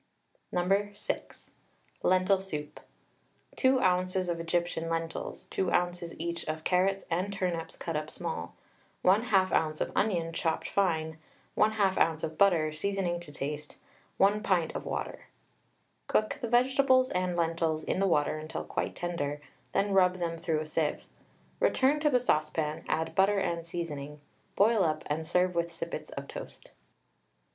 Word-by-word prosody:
No. 195 +3 +1
6. - - -5 0.5
LENTIL 185 +1 +3
SOUP. 150 -6 -6 0.8
2 260 0 +4
oz. 185 0 +2
of 170 -1 -1
Egyptian 165 0 -1
lentils, 165 0 -3
2 185 -2 0
oz. 175 -1 0
each 170 +1 -3
of 155 0 -3
carrots 190 +2 +2
and 185 +4 0
turnips 180 -4 -3
cut 165 - -4
up 155 0 -2
small, - - -5 0.5
1/2 195 -1 +4
oz. 155 -1 +1
of - - -1
onion 170 -6 +1
chopped 160 -1 -1
fine, 160 -5 0 0.4
1/2 210 -3 +3
oz. 160 -1 +2
of 160 0 -3
butter, 165 -6 +3
seasoning 180 +1 -1
to 170 -4 -10
taste, 150 +1 -5 0.4
1 205 +2 +4
pint 175 -6 +1
of - - -4
water. - - -4 0.8
Cook 215 - +1
the 235 - -2
vegetables 255 +1 +4
and 180 -1 0
lentils 165 -2 0
in - - -1
the 195 - +3
water 155 -2 +2
until 155 +1 -5
quite - - -3
tender, 160 -5 -3 0.3
then 200 +1 +1
rub 185 -1 +4
them 170 -2 -2
through 165 -2 -1
a - - -4
sieve. 155 0 -1 0.6
Return 275 +3 +3
to 300 0 +3
the 250 -3 +4
saucepan, 155 -7 0
add 160 0 -1
butter 195 +2 +4
and 170 -3 -1
seasoning, 150 -4 -5 0.4
boil 215 0 +4
up, 155 -2 0
and 155 +2 -2
serve 180 +2 +2
with 170 0 -1
sippets 165 -1 -5
of 140 0 -7
toast. - - -9
175 Hz, 150 wpm, -30 LUFS, 160-195 Hz, 0.8 s, 2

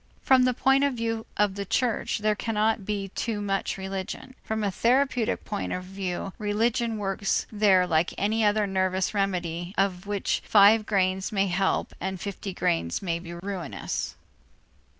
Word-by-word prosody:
From 260 -1 +5
the 255 - +2
point 270 +2 +3
of 280 -2 +1
view 225 -1 -2
of 205 -2 +2
the 200 0 -4
church, 235 +3 0
there 215 - +4
cannot 215 -1 0
be 200 -2 -2
too 220 +2 -3
much 195 -1 -1
religion; 190 +5 -5
from 220 0 -2
a 200 - +1
therapeutic 245 +2 +1
point 205 - -3
of 180 - -3
view, 190 0 -4
religion 225 +2 0
works 195 -1 -1
there 205 -4 +4
like 165 -1 +1
any 220 +2 +1
other 210 0 +3
nervous 190 0 0
remedy 180 -3 -2
of 195 -1 0
which 205 -1 -1
five 210 +1 +6
grains 190 0 +1
may 195 -2 +2
help 190 +1 0
and 190 -1 -3
fifty 200 +1 -5
grains 85 - -1
may 170 -2 -1
be 170 0 -9
ruinous. 180 -3 -4
200 Hz, 160 wpm, -26 LUFS, 185-220 Hz, -, five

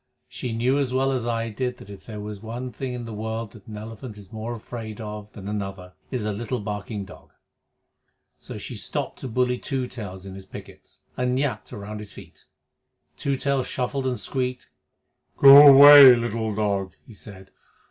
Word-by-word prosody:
She 125 - -6
knew 125 +5 +1
as 135 -3 -1
well 135 +1 +1
as 125 -3 -2
I 115 -1 -2
did 125 +3 -3
that 100 - -13
if 100 - -13
there 105 -2 -7
is 105 -2 -8
one 120 +3 -6
thing 125 +3 -5
in 120 -1 -6
the 115 - -7
world 110 0 -5
the 110 - -14 0.2
elephant 110 +1 -9
is 100 -2 -14
more 110 +2 -5
afraid 110 -1 -8
of 105 -1 -8
than 100 -2 -9
another 95 -3 -5 0.2
it - - -5
is 115 -4 -2
a 105 - -1
little 115 +4 -4
barking 105 0 -5
dog. - - -16 1.1
So - - -9
she - - -7
stopped - - -4
to - - -6
bully 125 +1 0
Two 130 -2 -3
Tails 100 -6 -8
in 95 - -8
his 95 0 -11
pickets, - - -13 0.2
and 125 0 0
yapped 125 -7 -2
round 105 +1 -7
his 105 -1 -10
big - - -17 0.2
feet. - - -25 0.7
Two 140 - -2
Tails 140 -1 -1
shuffled 130 +1 -2
and 125 -1 -2
squeaked. 125 -2 -4 0.7
"Go 140 +1 +10
away, 140 -1 +10
little 115 -2 -3
dog!" 100 -3 -1
he 115 - -14
said. 95 -2 -12
115 Hz, 190 wpm, -24 LUFS, 105-125 Hz, 1.1 s, Go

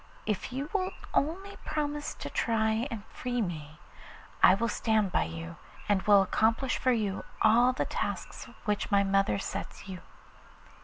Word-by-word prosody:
If 210 +3 -2
you 270 +3 -3
will 375 -2 0 0.2
only 380 +7 -1
promise 295 -1 -3
to - - -6
try 220 +1 +1
and 220 -4 -6
free 245 -1 -3
me 155 -7 -4 0.6
I 185 - +8
will 230 +4 0
stand 220 -4 +1
by - - +2
you, 80 0 -7 0.3
and 205 -2 +2
will 205 -1 +6
accomplish 225 +6 +1
for 255 - +3
you 210 -5 -1 0.2
all 235 +3 +6
the 255 - -1
tasks - - -4 0.2
which 210 -1 0
my 200 -1 +4
mother 195 +1 +2
sets 195 - -6
you. 185 -2 -7
220 Hz, 155 wpm, -30 LUFS, 195-255 Hz, 0.6 s, I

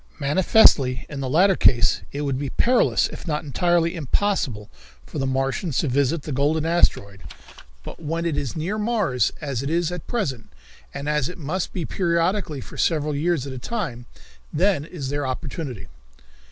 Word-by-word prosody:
"Manifestly 140 -4 +4
in 145 - -6
the 135 -1 -3
latter 185 +7 +4
case 120 -7 +3
it 145 - -4
would 140 -3 -1
be 140 -1 -3
perilous 245 - +3
if - - -10
not 150 -2 -1
entirely 170 +3 +1
impossible 145 - -1 0.4
for 150 - -6
the 135 - 0
Martians 135 +4 -1
to - - +1
visit 140 +4 +1
the 150 - -5
golden 150 +4 +1
asteroid, 100 - +1 0.6
but - - -9
when 165 +2 -2
it 165 -3 0
is 140 -4 -3
near 180 +7 -2
Mars, 210 - +1
as 140 -5 -3
it 140 - -3
is 170 +1 0
at 180 -2 -6
present, 145 - -3 0.4
and 140 - -6
as 150 -3 +1
it 180 - -8
must 170 +3 -3
be 175 -4 -3
periodically 170 -3 0
for - - -11
several 150 -3 +1
years 155 -1 0
at 135 - -6
a 130 - -6
time, 130 - -4 0.4
then 175 -3 +2
is 150 -6 -6
their 145 -1 -2
opportunity." 130 - -5
150 Hz, 175 wpm, -23 LUFS, 135-175 Hz, 0.6 s, Manifestly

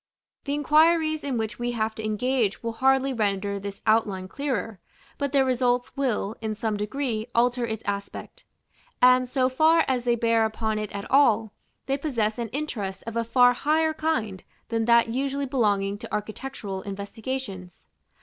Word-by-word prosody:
The 285 0 -1
inquiries 310 +1 +3
in 270 -4 -2
which 220 0 -3
we 240 0 -2
have 220 -1 -1
to 220 - -7
engage 215 0 0
will 230 - -2
hardly 265 +2 +2
render 200 -3 -1
this 200 0 -7
outline 210 -4 +1
clearer, 225 -5 -3 0.4
but 280 -2 -1
their 275 -2 +3
results 245 -1 0
will, 235 -6 -1
in 220 -1 -3
some 220 0 -2
degree, 220 +1 -2
alter 245 0 +2
its 220 -1 -4
aspect; 200 0 -5 0.6
and, 255 0 +5
so 255 -1 +2
far 315 +5 +4
as 250 -2 0
they 240 -1 +3
bear 230 -1 +2
upon 220 0 -1
it 215 -1 -4
at 200 0 -5
all, 230 -6 +4 0.3
they 275 +1 -1
possess 235 -7 -1
an 235 - -2
interest 215 -8 -4
of 230 0 -6
a 230 - +1
far 245 +1 +5
higher 315 +4 +1
kind 235 -12 -2 0.3
than 225 -1 0
that 235 0 +4
usually 275 +3 -1
belonging 205 -6 0
to - - -9
architectural 210 -2 -5
investigations. 200 -1 -6
235 Hz, 165 wpm, -25 LUFS, 210-265 Hz, 0.6 s, and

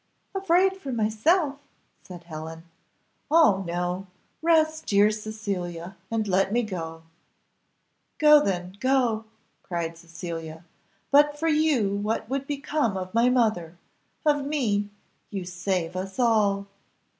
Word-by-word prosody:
"Afraid 385 0 +2
for 280 -8 -6
myself?" 275 - +1 0.4
said 175 -2 -11
Helen; 160 0 -8 0.7
"oh 290 -12 +5
no 180 +2 -2 0.3
rest, 315 -1 +2
dear 205 +1 +4
Cecilia, 195 -5 -5
and 225 -2 -1
let 195 +1 +2
me 240 +2 +2
go." 165 -6 -6 1.1
"Go 300 -1 +7
then, 180 -1 -2
go," 250 -4 +1 0.4
cried 170 -2 -4
Cecilia; 165 -1 -7 0.5
"but 290 +1 +5
for 325 +2 -1
you 300 -10 +2
what 210 +2 -2
would 275 0 -2
become 285 -6 -1
of 185 0 -6
my 235 +2 +4
mother! 215 -9 +1 0.5
of 290 -2 +3
me! 225 -9 0 0.4
you 195 -3 -5
save 180 -1 -2
us 190 +1 -5
all." 210 -5 +2
210 Hz, 120 wpm, -26 LUFS, 180-280 Hz, 1.1 s, Go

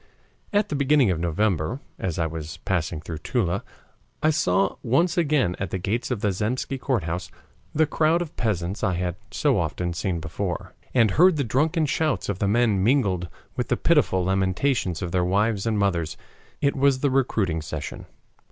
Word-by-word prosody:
At 205 0 +2
the - - -2
beginning 140 -5 +4
of 85 - -1
November, 85 - 0 0.2
as 90 -4 -2
I 80 - +1
was 80 -1 -5
passing 85 -4 -1
through 80 0 -6
Toula, 95 - -1 0.6
I 155 - +5
saw 95 -9 +1
once 155 +9 +2
again 145 - +2
at 95 - -2
the 95 - -2
gates 110 +7 -2
of 120 -5 -2
the 105 - +2
Zemsky 120 +7 -2
Courthouse 90 - -2 0.5
the 160 +1 +4
crowd 155 +2 +2
of 170 -3 -5
peasants 100 -4 -2
I 95 - +1
had 90 -1 -2
so - - +1
often 90 -1 -2
seen 85 0 -2
before, 90 +3 -4 0.2
and 115 -5 +4
heard 180 - +5
the 140 - +1
drunken 155 +7 +1
shouts 140 - 0
of 100 -2 -2
the 100 - +1
men 105 -3 +2
mingled 100 -8 +2 0.3
with - - -2
the - - +1
pitiful 95 -1 +3
lamentations 95 - 0
of 85 - -3
their 90 0 +2
wives 100 +3 +1
and 110 -2 +1
mothers. 90 -6 0 0.4
It 140 - +2
was 135 -1 +3
the 140 - +2
recruiting 105 -11 +1
session. 80 - -6
100 Hz, 180 wpm, -24 LUFS, 90-135 Hz, 0.6 s, I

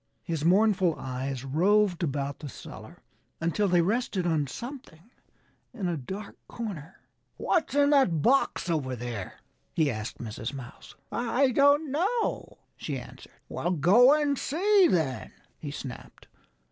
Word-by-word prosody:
His 160 -3 -3
mournful 185 -1 +3
eyes 130 0 -4
roved 185 +6 +2
about 140 -3 -2
the 150 - -7
cellar - - -11 0.4
until 170 +5 0
they 175 -2 +3
rested 205 -2 -1
on 155 -4 +1
something 235 - -9 0.6
in 200 -6 -2
a 175 - -1
dark 190 +9 -7
corner. 190 -7 -7 0.4
"What's 335 -5 0
in 285 0 +4
that 190 - +3
box 270 -6 +2
over 145 -7 -1
there?" 115 -5 -6 0.4
he 155 -4 +2
asked 110 0 -5
Mrs. 115 +3 -6
Mouse. 125 -3 -11 0.2
"I 245 +3 +1
don't 285 +3 +4
know," 395 - -1 0.2
she - - -4
answered. - - -12
"Well - - -3
go 195 - +6
and 285 -2 0
see, 385 +5 +3
then!" 155 - -1 0.3
he 145 - -6
snapped. 135 -3 -9
175 Hz, 135 wpm, -28 LUFS, -, 0.6 s, go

